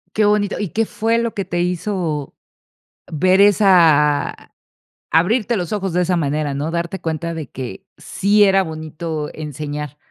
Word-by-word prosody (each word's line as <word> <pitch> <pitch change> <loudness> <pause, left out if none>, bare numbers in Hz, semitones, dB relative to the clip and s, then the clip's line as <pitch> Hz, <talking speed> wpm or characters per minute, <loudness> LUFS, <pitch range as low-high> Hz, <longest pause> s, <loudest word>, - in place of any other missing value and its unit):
Qué 215 - +3
bonito, 210 -1 +1
¿y 205 - -2
qué 225 +6 -1
fue 225 +2 0
lo 235 -1 -2
que 200 - -3
te 175 -1 -2
hizo 175 -5 -2 0.7
ver 185 +5 +3
esa 170 -8 +4 0.6
abrirte 215 +7 +2
los 180 +2 -3
ojos 195 -4 -2
de 180 0 +2
esa 180 +1 0
manera?, 150 -2 -1
¿no?, 145 +3 -3
darte 170 +2 -3
cuenta 165 +1 -3
de 160 -4 -6
que 125 -7 -8
sí 205 +2 +2
era 195 -1 +4
bonito 155 -2 -5
enseñar. 150 -1 -6
170 Hz, 155 wpm, -19 LUFS, 155-200 Hz, 0.7 s, esa